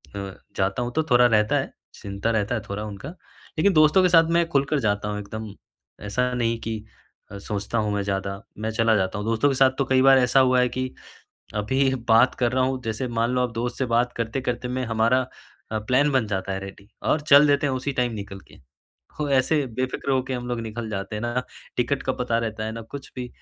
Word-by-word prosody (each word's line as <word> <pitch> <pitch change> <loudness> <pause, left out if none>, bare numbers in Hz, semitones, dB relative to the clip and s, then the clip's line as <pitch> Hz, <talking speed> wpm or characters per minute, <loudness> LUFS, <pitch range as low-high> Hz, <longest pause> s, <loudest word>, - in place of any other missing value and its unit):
अ, 100 -1 -5 0.2
जाता 95 +5 0
हूँ 120 - -2
तो 160 - +2
थोड़ा 125 0 +6
रहता 105 -3 +3
है, - - -4 0.2
चिंता 100 +3 -3
रहता 110 +1 0
है, 110 - -2
थोड़ा 100 +1 -3
उनका। 105 +5 -7 0.5
लेकिन 195 +5 +3
दोस्तों 155 +3 +5
के 180 - +4
साथ 165 -2 +6
मैं 170 0 +3
खुलकर 140 +1 +1
जाता 105 -4 0
हूँ 105 0 -3
,एकदम 110 +1 -7 0.6
ऐसा 125 +5 0
नहीं 115 -2 0
कि 115 0 -3 0.6
अ, 100 - -7
सोचता 105 +3 -4
हूँ 105 -2 0
मैं 100 - 0
ज़्यादा, 100 0 -3 0.2
मैं 110 +1 -3
चला 115 0 +2
जाता 95 0 0
हूँ। 105 - -4
दोस्तों 115 +5 +2
के 135 - 0
साथ 130 0 +5
तो 135 - +1
कई 130 -1 +3
बार 135 0 +7
ऐसा 125 +1 +4
हुआ 130 -1 +4
है, 125 - +2
कि 130 +1 -4 0.6
अभी 130 +6 +1 0.2
बात 115 +3 +5
कर 120 -2 +1
रहा 130 0 +2
हूँ, 130 0 -1
जैसे 115 +3 -3
मान 115 0 0
लो 125 - +1
आप 125 -1 -1
दोस्त 120 +2 -3
से 130 - 0
बात 120 +1 +1
करते-करते 125 +1 -2
मैं 130 +1 -2
हमारा 115 +3 +2 0.5
प्लान 125 +7 +2
बन 130 -5 +1
जाता 95 -1 -3
है, 95 - -3
रेडी 100 +1 -11
और 150 - +1
चल 145 0 +6
देते 145 0 +2
हैं 135 - 0
उसी 130 +2 -2
टाइम 125 -1 0
निकल 100 -2 -7
के। - - -17 0.6
तो 150 - -1
ऐसे 140 +3 +2
बेफिक्र 130 +1 -2
हो 130 -1 +2
के 130 - -6
हम 125 -1 -4
लोग 120 -1 -2
निकल 115 0 -5
जाते 100 0 -4
हैं - - -4
ना, 120 +2 -1 0.3
टिकट 130 +3 0
का 130 - -1
पता 125 -2 -1
रहता 110 -2 -3
है 110 - -3
ना 115 0 -6
कुछ 140 +5 -9
भी, 125 -1 -4
120 Hz, 230 wpm, -24 LUFS, 105-130 Hz, 0.6 s, बार